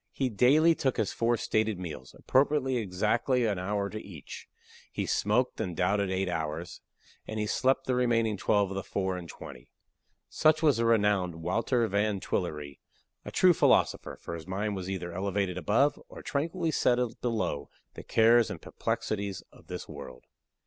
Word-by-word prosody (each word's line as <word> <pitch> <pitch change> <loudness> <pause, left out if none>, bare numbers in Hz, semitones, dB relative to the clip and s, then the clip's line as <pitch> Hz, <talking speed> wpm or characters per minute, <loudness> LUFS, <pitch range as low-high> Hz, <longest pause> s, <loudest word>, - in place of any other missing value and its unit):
He 135 -2 0
daily 140 +10 +5
took 135 -5 -1
his 110 -4 0
four 120 0 +1
stated 110 -1 0
meals, 75 -8 -8
appropriating 135 -1 +2
exactly 110 +6 +1
an 100 -4 0
hour 100 +2 -1
to 110 +1 -6
each; 85 -8 -10 0.4
he - - -2
smoked 120 +5 +1
and 90 -3 -4
doubted 100 +2 +1
eight 95 0 -1
hours, 80 0 -4 0.5
and 110 - -4
he 105 - 0
slept 130 +5 +1
the 130 - 0
remaining 115 -3 +2
twelve 100 0 +1
of - - -4
the 95 - -2
four 95 0 -2
and 85 -2 -7
twenty. 60 -2 -11 0.6
Such 155 0 +2
was 150 -6 +4
the 115 - +1
renowned 105 -6 +2
Wouter 115 +6 +1
Van 100 0 0
Twillerï 75 -7 -3 0.5
a - - -5
true 185 -1 +5
philosopher, - - +2
for - - -7
his 85 +1 -7
mind 100 +2 -2
was 95 -1 -5
either 90 -3 -4
elevated 95 0 -1
above, 110 - +2
or - - -11
tranquilly 165 +3 -1
settled 125 -4 +1
below, 115 -11 -2 0.2
the - - -8
cares 115 +1 +4
and 100 -5 -6
perplexities 100 0 -3
of - - -19
this - - -6
world. 65 0 -10
105 Hz, 170 wpm, -29 LUFS, 90-120 Hz, 0.6 s, daily